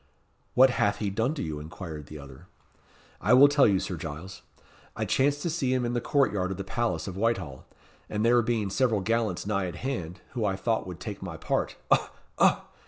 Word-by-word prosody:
"What 130 +1 +7
hath 105 -4 +1
he 100 -2 -2
done 115 +9 0
to - - -3
you?" 75 -2 -4
inquired 80 -2 -8
the 75 - -9
other. 70 +4 -12 0.7
"I 115 - +5
will 140 +3 +9
tell 145 -1 +5
you, 100 -3 +3
Sir 90 - -4
Giles. 80 +5 -7 0.5
I - - -2
chanced 145 +2 +1
to 170 - 0
see 140 -6 0
him 125 -1 0
in 120 - -1
the 120 - 0
court 140 -2 +2
yard 95 -2 -1
of 95 - -4
the 100 - -4
palace 115 +4 -2
of 95 - -5
Whitehall, 95 - -2 0.4
and 105 +1 -1
there 120 +1 +5
being 110 -4 -1
several 115 -3 +2
gallants 110 -3 0
nigh 100 -2 0
at 90 - -6
hand, 90 -7 -4
who 120 -4 -3
I 100 -2 +1
thought 110 +1 -1
would 90 -2 -7
take 100 0 -6
my 90 -4 -6
part - - -1 0.2
ough! - - +4 0.3
ough! - - +5
105 Hz, 215 wpm, -27 LUFS, 90-120 Hz, 0.7 s, will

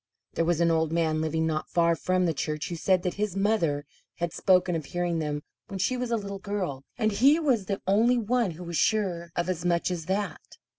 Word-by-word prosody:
There 165 - 0
was 170 -1 +1
an 170 0 +4
old 160 -1 +1
man 160 -2 +1
living 160 0 0
not 155 -1 -2
far 170 -1 +3
from 185 +2 +1
the 165 - +1
church 150 +1 -3
who 175 - -3
said 185 +2 +2
that 180 - -1
his 210 -3 -1
mother 170 -9 +1 0.3
had 170 -1 -3
spoken 180 -2 +3
of 160 -3 -3
hearing 175 0 -1
them 150 -1 -3 0.2
when 195 - -6
she 200 +7 +1
was 250 -1 -3
a 230 - +1
little 200 -2 -6
girl, 190 -10 -3
and 215 -2 +1
he 270 +9 +5
was 255 - +1
the 200 -1 -3
only 225 +6 +4
one 235 -1 +1
who 170 +1 -8
was 170 -1 -3
sure 180 -4 +1
of 175 0 -1
as 185 -2 -2
much 175 0 +1
as 165 -3 -4
that. 190 -3 -2
175 Hz, 230 wpm, -27 LUFS, 165-200 Hz, 0.3 s, he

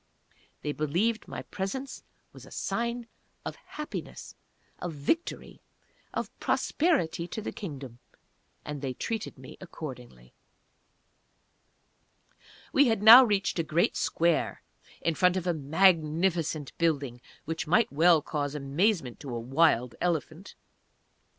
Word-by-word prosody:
They 150 - -1
believed 170 +11 0
my - - -6
presence 260 +8 -5 0.3
was - - -13
a - - -13
sign 235 +1 -2 0.4
of - - -4
Happiness 300 0 -8 0.5
of 175 -2 -4
Victory 150 - -2 0.5
of - - -4
Prosperity 270 - +1
to 220 - -5
the 215 - -4
Kingdom 135 - -8 0.7
and 150 -2 -5
they 130 -3 -3
treated 225 - -4
me 130 0 -12
accordingly. 125 - -9 2.4
We 280 0 +5
had 225 -3 +1
now 235 +4 +12
reached 200 -6 0
a - - +2
great 160 +2 +1
square 170 -1 0 0.4
in 165 - +1
front 180 +2 +3
of 185 - -3
a 175 - +1
magnificent 160 0 +1
building 140 -7 0 0.2
which 165 +1 -3
might 210 +2 +3
well 160 0 +5
cause 145 -2 -3
amazement 145 - 0
to 140 - -8
a - - -2
"wild" 125 -1 +2
elephant. 170 +1 -2
165 Hz, 120 wpm, -28 LUFS, 145-195 Hz, 2.4 s, now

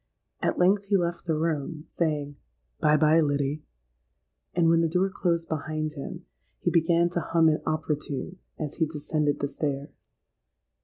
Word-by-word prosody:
At - - 0
length 195 +3 +3
he 200 0 +3
left 170 -1 -2
the 160 - +2
room, 155 0 -2
saying, 150 -4 -1 0.4
'Bye, 150 0 +4
bye, 155 +1 +5
Liddy;' 145 0 0 0.9
and 170 -1 +4
when 165 0 +5
the 165 - +2
door 185 +3 +1
closed 170 -4 0
behind 155 0 -2
him, 140 -3 -7 0.3
he - - 0
began 170 +1 +3
to 175 - -1
hum 165 0 +3
an 155 - 0
opera 155 -1 0
tune, 150 +5 -5 0.2
as 150 -2 -4
he 160 - +2
descended 150 -1 -1
the 140 - +1
stairs. 140 0 -4
155 Hz, 160 wpm, -27 LUFS, 150-170 Hz, 0.9 s, bye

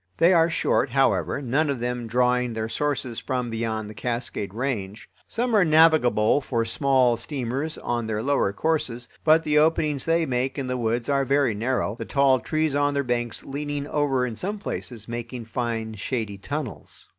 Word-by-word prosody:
They 170 +3 +5
are 165 -1 +4
short, 165 - +1
however, 135 +1 +1
none 145 +5 +1
of 140 -3 -1
them 120 0 -3
drawing 125 +1 +1
their 110 0 -2
sources 130 -1 -2
from 125 -3 -3
beyond 110 -1 -2
the 105 - -8
Cascade 115 -3 -3
Range. 110 -4 -4 0.2
Some 240 0 -1
are 205 - +6
navigable 155 -7 +4
for 115 -4 -1
small 125 0 +2
steamers 135 +4 -3
on 120 -2 -2
their 110 0 -2
lower 140 -7 +2
courses, 125 -2 -1 0.2
but 160 +1 +5
the 150 -1 +3
openings 155 -3 +1
they 165 0 +2
make 130 +1 -1
in 135 - -2
the 125 0 -2
woods 115 0 -1
are 140 -1 +2
very 135 -3 +2
narrow, 115 0 -1
the - - -4
tall 140 -2 +3
trees 155 +3 -1
on 145 0 +1
their 140 - +1
banks 120 -2 -2
leaning 145 +1 -4
over 135 -4 +1
in 120 -3 -4
some 200 - -3
places, 120 - -6
making 120 0 -6
fine 115 -1 -3
shady 110 -2 -4
tunnels. 140 +2 -6
125 Hz, 180 wpm, -25 LUFS, 115-145 Hz, 0.2 s, are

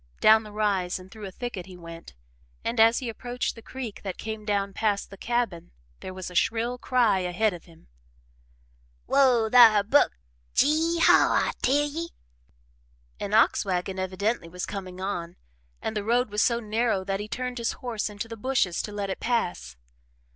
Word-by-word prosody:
Down 220 0 +6
the 215 -1 -11
rise 200 -4 0
and 185 +1 -13
through 215 -3 -8
a - - -8
thicket 195 -4 -6
he 185 -1 -11
went, 165 - -11 0.5
and 230 0 -2
as 225 +1 +6
he 255 - -3
approached 245 +2 -3
the 225 - -12
creek 240 -3 -7
that 190 -2 -5
came 220 -1 -6
down 200 -1 -1
past 205 -2 -1
the - - -8
cabin 235 -7 -2 0.3
there - - -7
was 185 -1 -7
a - - -10
shrill 230 +6 0
cry 240 -7 +2
ahead 185 +4 0
of 175 - -10
him. 165 -2 -19 1.2
"Whoa 255 -5 +4
thar, 225 -4 +8
Buck! 270 +8 +3 0.4
Gee 320 +4 +3
haw, - - +6
I - - -1
tell 290 +3 +2
ye!" 330 +3 -5 1.1
An 205 +1 -1
ox 225 - +4
wagon 190 -1 -2
evidently 190 0 -2
was 180 +1 -5
coming 185 -2 -7
on, 175 -3 -4 0.5
and 220 - -3
the 210 - -1
road 235 +1 +1
was 210 +1 +1
so 235 -1 +2
narrow 220 -2 0
that 195 0 -2
he 210 - -5
turned 250 +2 -4
his 230 - -1
horse 230 -4 -4
into 210 +2 -6
the 230 - -7
bushes 225 -6 0
to 210 - -6
let 200 -1 -3
it - - -5
pass. 180 - -2
215 Hz, 185 wpm, -26 LUFS, 190-240 Hz, 1.2 s, thar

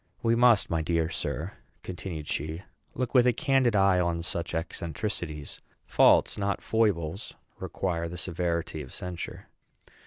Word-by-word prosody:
We 115 - +3
must, 120 -5 +4
my 80 -1 +1
dear 80 0 0
sir," - - -3 0.3
continued 85 -4 -6
she, 80 +5 -3 0.3
"look 125 -1 -2
with 125 -2 +6
a 125 - +4
candid 135 -4 +2
eye 95 -2 +4
on 85 -1 0
such 85 -1 -4
eccentricities. 80 -1 -4 0.2
Faults, - - +4
not 100 -2 0
foibles, 100 -5 0 0.2
require 85 -3 -2
the 90 - -7
severity 85 -2 -2
of 65 - -10
censure." 90 -2 -6
90 Hz, 135 wpm, -28 LUFS, 85-105 Hz, 0.3 s, with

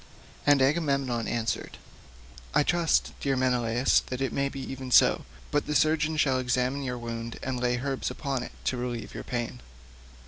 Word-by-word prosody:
And 145 -2 +6
Agamemnon 140 -5 +1
answered, 115 -1 -2 0.8
"I 150 - +5
trust, 170 +1 +2
dear 135 -1 0
Menelaus, 125 -1 +3
that 125 - -4
it 135 - -1
may 140 0 0
be 135 - -7
even 130 -1 -6
so, - - +5 0.3
but 145 - 0
the 150 - -1
surgeon 155 +2 +2
shall 135 -4 +3
examine 125 +2 0
your 125 -2 -3
wound 115 -1 -5
and 130 -1 -2
lay 125 0 +1
herbs 135 +1 -2
upon 135 -3 -3
it 125 - -7
to 130 - 0
relieve 120 -3 -4
your - - -6
pain." 120 0 -3
130 Hz, 170 wpm, -28 LUFS, 125-140 Hz, 0.8 s, And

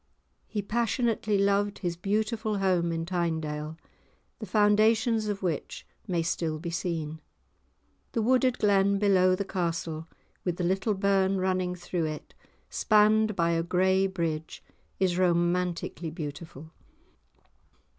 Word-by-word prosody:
He 210 -2 -3
passionately 230 -1 0
loved 200 +1 +1
his 175 -3 -3
beautiful 215 +3 -1
home 180 -3 +1
in 165 0 -2
Tynedale, 160 -3 -2 0.6
the 215 - -6
foundations 215 +3 +3
of 200 -2 -3
which 170 -5 -3 0.2
may 175 -4 0
still 160 -2 -1
be 170 +2 -5
seen. 160 -3 -3 0.9
The 225 - 0
wooded 255 +1 +3
glen 200 -1 +3
below 185 -2 +4
the 200 +1 -3
castle, 170 -3 -3 0.4
with 175 -2 -2
the 180 - -2
little 190 +4 +1
burn 195 0 +2
running 185 -1 0
through 175 -1 -3
it, 155 -1 -6 0.3
spanned 215 0 +3
by 170 -2 +2
a 165 0 +1
grey 190 +3 +2
bridge 165 -4 -4 0.4
is 185 -2 +1
romantically 175 -1 0
beautiful. 155 -1 -8
185 Hz, 125 wpm, -28 LUFS, 170-205 Hz, 0.9 s, below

